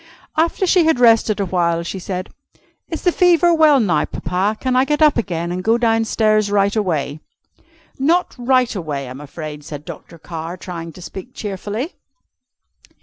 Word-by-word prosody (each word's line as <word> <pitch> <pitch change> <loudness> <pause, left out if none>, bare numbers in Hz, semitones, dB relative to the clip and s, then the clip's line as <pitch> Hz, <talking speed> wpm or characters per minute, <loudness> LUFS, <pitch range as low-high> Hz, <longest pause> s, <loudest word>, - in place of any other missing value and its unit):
After 330 +4 +1
she 360 -2 +4
had 320 -6 +2
rested 225 -3 +4
a 200 - +1
while, 170 -2 0
she 190 +3 -5
said: 185 0 -5 0.6
"Is 325 - -5
the 355 - +4
fever 350 -1 +4
well 310 -4 +5
now, 205 -7 +1
Papa? 195 +4 -2
Can 255 -1 -1
I 255 - +5
get 295 +2 0
up 305 -2 +5
again 175 -6 -2
and 180 +1 -3
go 225 +3 +3
down 225 -1 +2
stairs 215 -1 +2
right 200 0 +2
away?" 160 -8 -1 0.8
"Not 335 +6 +2
right 255 -1 +2
away, 150 -7 -4
I'm 130 +3 -8
afraid," 150 0 -8
said 145 0 -8
Dr. 170 - -10
Carr, 165 +1 -7
trying 170 -2 -7
to 180 - -12
speak 195 +7 -9
cheerfully. 210 - -5
205 Hz, 170 wpm, -19 LUFS, 170-255 Hz, 0.8 s, well